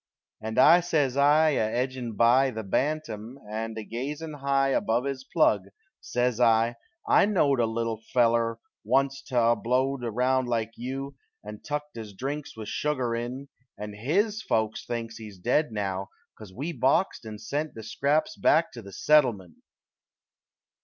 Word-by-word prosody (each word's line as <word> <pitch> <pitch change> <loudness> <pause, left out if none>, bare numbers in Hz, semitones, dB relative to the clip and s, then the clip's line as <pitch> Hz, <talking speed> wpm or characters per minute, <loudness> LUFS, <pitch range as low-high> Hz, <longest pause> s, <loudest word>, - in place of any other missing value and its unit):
And 110 0 -5
I 165 +6 +8
says 150 -7 0
I, 150 +3 +5
a 140 - 0
edgin' 125 -1 -2
by 120 +5 +4
The 110 -3 -5
bantam, 120 0 -2
and 110 +1 -4
a 110 - -4
gazin' 145 +8 -5
high 140 -1 +1
Above 120 -2 +1
his 135 -1 -4
plug 110 - +2 0.3
says 125 -1 -1
I: 115 0 +3 0.3
"I - - +5
knowed 145 -10 +2
A 115 - +3
little 115 -1 -2
feller 115 -2 +2 0.3
onc't 135 +5 0
'at 120 -2 +4
blowed 130 +2 0
Around 125 +3 +1
like 115 -2 -1
you, 135 +3 -5 0.3
and 105 0 -9
tuck 150 -1 -2
his 110 -3 -8
drinks 140 +3 -5
With 110 -1 -7
shugar 130 -6 -1
in 125 +4 -5 0.3
and 105 0 -6
his 200 - 0
folks 110 - -1
thinks 115 -1 -4
He's 105 -3 -10
dead 125 - +1
now 100 -2 -3 0.3
'cause 105 -4 -12
we 140 - -4
boxed 135 +5 +1
and 110 -2 -8
sent 145 +8 -3
The 110 - -8
scraps 145 +7 0
back 165 +2 +3
to 120 - -9
the 100 -2 -11
Settlement!" 115 - +2
125 Hz, 155 wpm, -27 LUFS, 110-140 Hz, 0.3 s, I